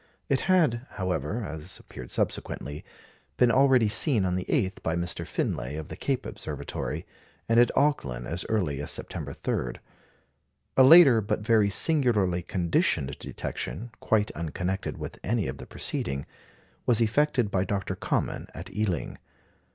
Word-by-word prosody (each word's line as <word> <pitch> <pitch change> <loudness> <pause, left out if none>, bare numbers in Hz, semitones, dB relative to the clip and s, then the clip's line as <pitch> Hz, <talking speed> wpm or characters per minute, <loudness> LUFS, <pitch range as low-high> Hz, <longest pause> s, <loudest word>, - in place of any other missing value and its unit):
It 135 - +3
had, 145 -10 +3
however 95 - -2
(as 80 +1 -6
appeared 65 -1 -11
subsequently), 75 +2 -3 0.5
been 120 - +5
already 130 -3 +5
seen 115 - +4
on 90 -1 0
the 90 - -2
8th 105 -8 0
by 80 - -1
Mr. 85 0 -2
Finlay 60 +4 -2
of 80 -2 -6
the - - -6
Cape - - -2
Observatory, - - -5 0.4
and 115 +1 +4
at 120 - +6
Auckland 70 - +1
as 85 +6 -3
early 85 -11 0
as 70 - -4
September - - -4
3. - - -2 1.0
A 130 - +7
later, 135 -5 +8
but 105 +1 -2
very 110 -2 +3
singularly 105 - +2
conditioned 85 -6 0
detection, 115 +8 -5
quite 110 -1 +1
unconnected 90 +4 -3
with - - -7
any 110 +1 0
of - - -5
the - - -9
preceding, 70 +1 -3 0.6
was 120 -2 +4
effected 120 -1 +2
by 95 -1 +1
Dr. 95 -1 -2
Common - - -2
at 95 +4 -8
Ealing. 105 -5 -2
100 Hz, 145 wpm, -27 LUFS, 85-120 Hz, 1.0 s, later